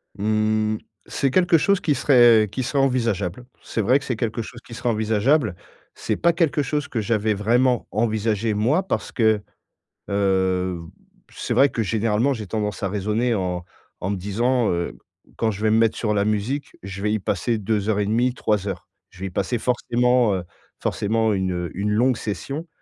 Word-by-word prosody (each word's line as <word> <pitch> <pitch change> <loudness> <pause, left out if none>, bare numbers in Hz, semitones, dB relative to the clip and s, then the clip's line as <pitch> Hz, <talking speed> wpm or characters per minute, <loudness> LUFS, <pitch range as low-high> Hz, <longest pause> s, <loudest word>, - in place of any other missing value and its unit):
Mmh. 110 +1 +1 0.3
C'est 135 -2 0
quelque 175 0 +4
chose 200 +4 +2
qui 150 -3 +1
serait 120 -7 +5
qui 130 - -3
serait 140 +3 -1
envisageable. 115 -5 -1 0.2
C'est - - -4
vrai 125 +7 +4
que 140 - -7
c'est 125 -4 -3
quelque 115 0 -2
chose 120 +2 -9
qui 115 - -11
serait 120 +1 -2
envisageable. 110 - +1 0.4
C'est - - -2
pas 170 0 +3
quelque 165 -3 +1
chose 145 +2 -2
que 115 - -2
j'avais 110 0 +1
vraiment 120 +4 +2
envisagé, 110 0 0
moi, 125 - +2
parce 190 - -3
que, 110 -3 +2 0.7
heu, 95 -2 +1 0.5
c'est - - -3
vrai 140 +1 +5
que, 115 - -2
généralement, 110 +4 +1
j'ai 110 -4 -6
tendance 105 -2 -3
à 95 - 0
raisonner 105 +5 0
en 90 -3 -2 0.3
en 90 - -3
me - - 0
disant, 115 +6 0
heu,: 85 0 -2 0.4
«Quand 115 - +1
je 105 0 -7
vais 110 - +3
me 110 - +4
mettre 115 -1 +2
sur 105 -2 0
la 100 -1 +2
musique, 110 +7 -2
je 100 0 -7
vais 105 +1 0
y 110 - +2
passer 100 +4 -1
2 105 0 -1
heures 105 -1 +1
et 100 - +1
demie, 120 +4 +1
3 105 -3 0
heures». 95 -2 -5 0.2
Je - - -18
vais 95 - -2
y - - -5
passer 120 - -1
forcément, 125 -1 +2
heu, 90 - -3 0.4
forcément, 110 +1 0
une, 95 -1 -1
heu, 90 -2 -3
une 100 +3 -2
longue 120 +3 +2
session. 135 - -5
110 Hz, 190 wpm, -23 LUFS, 100-125 Hz, 0.7 s, serait